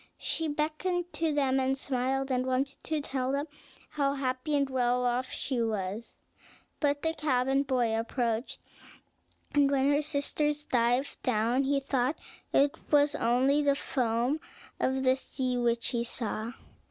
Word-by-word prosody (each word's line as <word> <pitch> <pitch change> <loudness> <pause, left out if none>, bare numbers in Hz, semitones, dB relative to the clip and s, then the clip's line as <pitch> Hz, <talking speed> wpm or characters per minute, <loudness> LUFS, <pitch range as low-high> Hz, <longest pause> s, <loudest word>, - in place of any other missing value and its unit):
She 325 - -1
beckoned 330 +4 -2
to 325 -1 0
them, 270 -2 +2
and 265 +1 +1
smiled, 270 0 -1
and 255 0 +1
wanted 260 +2 -2
to 310 -1 -1
tell 265 -2 -2
them 280 +1 0 0.5
how 280 -2 0
happy 265 +2 -1
and 280 -1 +2
well 250 -1 +1
off 245 +1 0
she 255 -3 -2
was; 215 0 -3 0.6
but 290 -1 +1
the 320 0 +1
cabin 270 -3 +1
boy 250 -5 +1
approached, 230 +1 -2 0.9
and 285 -1 +4
when 275 0 +3
her 290 +1 +3
sisters 295 0 0
dived 245 0 +1
down 245 +3 +1
he 280 +1 +2
thought 270 +1 0 0.3
it 280 +1 +4 0.2
was 290 -1 +4
only 260 +5 +2
the 285 -1 +3
foam 245 +2 0 0.4
of 265 0 0
the 260 0 +4
sea 260 -1 -2
which 235 -1 +1
he 235 -2 0
saw. 230 -1 -2
265 Hz, 150 wpm, -29 LUFS, 245-285 Hz, 0.9 s, and